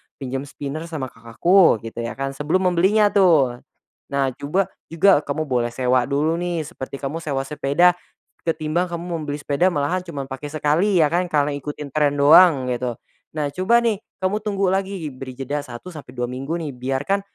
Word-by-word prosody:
pinjam 135 0 -5
spinner 150 +4 -6
sama 140 -6 -5
kakakku 115 - +3
gitu 115 +1 -7
ya 115 0 -4
kan, 135 0 -3
sebelum 180 +7 +1
membelinya 205 +4 +3
tuh. 150 -11 +4 0.6
Nah, 135 -1 +1
coba 180 +7 -1 0.2
juga 170 0 +4
kamu 150 +2 -2
boleh 120 -4 -1
sewa 125 0 +2
dulu 155 +4 0
nih, 175 -2 -2
seperti 140 -4 -8
kamu 150 +5 -3
sewa 140 -4 -2
sepeda, 145 +5 +3 0.6
ketimbang 165 +3 0
kamu 170 0 -5 0.2
membeli 145 -1 -3
sepeda 150 +6 +1
malahan 170 +2 0
cuman 145 -6 -5
pakai 135 +2 -5
sekali 160 +4 +2
ya 150 - +1
kan, 180 +1 +1
karena 150 -3 +1
ikutin 145 0 -6
tren 145 -1 +2
doang, 145 -2 +6
gitu. 125 -1 -2 0.4
Nah 150 -1 -1
coba 185 +6 +3
nih, 220 -4 +1 0.2
kamu 200 +3 +1
tunggu 200 -3 0
lagi, 195 -3 -2
beri 130 0 -9
jeda 145 +2 -3
1 130 +7 -9
sampai 155 - -10
2 125 - 0
minggu 135 +7 -4
nih, 155 -4 -4
biarkan, 135 +10 -1
150 Hz, 175 wpm, -22 LUFS, 135-175 Hz, 0.6 s, doang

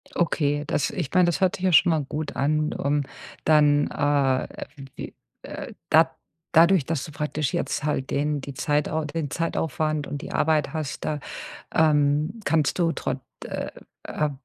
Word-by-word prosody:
Okay, 145 -3 +1
das 145 - 0
ich 165 -8 -3
meine, 180 -1 +6
das 175 +3 0
hört 185 -1 +2
sich 185 - -7
ja 185 - +3
schon 175 +1 +6
mal 155 -3 +1
gut 150 +2 -5
an. 150 +2 +1
Ähm, 145 +1 +2 0.4
dann, 150 -2 +4
äh 140 -3 +1 0.3
w 135 -1 -9
wie, - - -7 0.3
äh - - -7 0.2
dad 160 +1 +6 0.4
dadurch, 170 -1 +6
dass 155 -2 -2
du 155 - -9
praktisch 150 -1 -2
jetzt 150 - -1
halt 135 -3 -1
den 145 0 0
die 140 - -6
Zeitau 150 +3 0
den 150 -1 -3
Zeitaufwand 155 -2 -1
und 145 - -5
die - - -7
Arbeit 155 -2 +1
hast, 155 -3 -4
da 150 -1 -1 0.6
ähm, 150 +5 +2
kannst 155 -1 +1
du 170 -2 +2
trot 130 -4 -3 0.3
äh - - -4 0.3
äh, 150 -1 -1
150 Hz, 170 wpm, -25 LUFS, 145-160 Hz, 0.6 s, meine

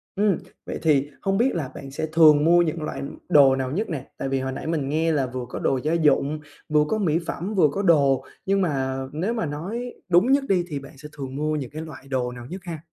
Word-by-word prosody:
Ừm, 200 -2 +2 0.3
vậy - - -5
thì 145 -3 +2
không 195 0 0
biết 255 +4 +2
là 150 -6 -2
bạn 135 -1 -8
sẽ 150 - -3
thường 155 -2 +7
mua 175 +1 +6
những 165 -1 -1
loại 135 -3 -4 0.3
đồ 135 -3 +6
nào 130 -1 -2
nhất 205 +9 -2
nè? 140 -5 -5
Tại 135 - -3
vì 135 0 0
hồi 130 0 -3
nãy 135 - -6
mình 150 -4 -1
nghe 160 +2 +1
là 140 -4 +1
vừa 125 -1 -5
có - - -5
đồ 135 - +1
gia 155 +2 0
dụng, 155 -2 +2 0.3
vừa 150 -1 +4
có 220 - 0
mỹ 170 -6 +1
phẩm, 195 +6 -3
vừa 180 -6 +5
có 195 - -2
đồ, 140 -8 +3 0.2
nhưng 195 0 +2
mà 135 -6 -1
nếu 180 +10 -1
mà 225 -8 -1
nói 200 +12 -4 0.2
đúng 180 +9 +4
nhất 275 0 +4
đi 185 -3 +3
thì 145 -4 -4
bạn 140 0 -13
sẽ 150 +2 -10
thường 135 -2 -6
mua 155 +1 -1
những 135 -5 -4
cái 155 +2 -6
loại 145 -4 -10
đồ 125 -2 -1
nào 120 -1 -9
nhất 185 +7 -7
ha? 165 -4 -6
155 Hz, 255 wpm, -24 LUFS, 135-175 Hz, 0.3 s, thường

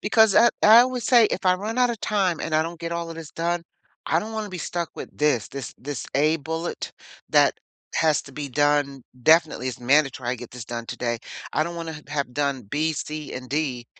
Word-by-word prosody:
Because 220 -1 +4
I 235 - +7
I 225 +3 +9
would 255 -2 -3
say, 235 -2 +6
"If 190 - -3
I 185 0 +5
run 215 +6 -4
out 245 -1 +4
of 230 - -5
time 190 -6 0
and 160 - -3
I 155 - +4
don't 170 +1 -6
get 170 0 -4
all 170 -1 -3
of 165 - -8
this 160 -3 -8
done, 170 +1 -1 0.4
I 160 - +2
don't 220 +4 -5
wanna 215 -1 -3
be 185 -2 -6
stuck 170 -1 -3
with - - -9
this. 145 -7 +1
This 140 -1 -7
this 140 -1 -5
a 155 +3 +3
bullet 160 +2 -4 0.4
that - - +4 0.4
has 155 -2 +3
to 140 - -13
be 145 0 -5
done 145 -1 +1 0.2
definitely 160 -4 +4
as 125 - -6
mandatory 135 -1 +2
I - - 0
get 120 -1 -10
this 125 -2 -8
done 115 0 -6
today." 120 -1 -2 0.3
I - - +2
don't 170 +1 -5
wanna 160 -2 -6
have 140 -4 -2
done 140 -2 -1
B, 155 +10 -1
C, 150 0 -5
and 130 0 -7
D 135 -5 -2
155 Hz, 225 wpm, -24 LUFS, 140-175 Hz, 0.4 s, I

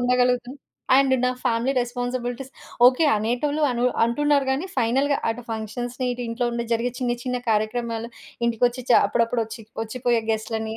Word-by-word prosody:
ఉండగలుగుతాను. 250 +1 +1 0.4
And 270 -1 +4
నా 250 - +3
family 235 +4 +1
responsibilities 245 +1 -4 0.3
okay. 255 +6 +4
అనేటోళ్ళు 245 +8 -1
అను 245 0 -1 0.2
అంటున్నారు 280 +3 +2
గాని 285 +8 -2
ఫైనల్‌గా 270 +4 +2
అటు 235 +2 -6
ఫంక్షన్స్‌ని, 240 +3 -4
ఇటు 245 0 -5
ఇంట్లో 240 +1 -1
ఉండే 235 0 -3
జరిగే 235 +2 0
చిన్న 245 -1 0
చిన్న 250 0 -1
కార్యక్రమాలు, 230 +2 -1 0.4
ఇంటికొచ్చి 240 +2 +1
చా - - +8
అప్పుడప్పుడొచ్చి 230 -1 -1 0.2
ఒచ్చిపోయే 240 +1 0
గెస్ట్‌లని, 220 0 -2
245 Hz, 140 wpm, -23 LUFS, 230-255 Hz, 0.4 s, చా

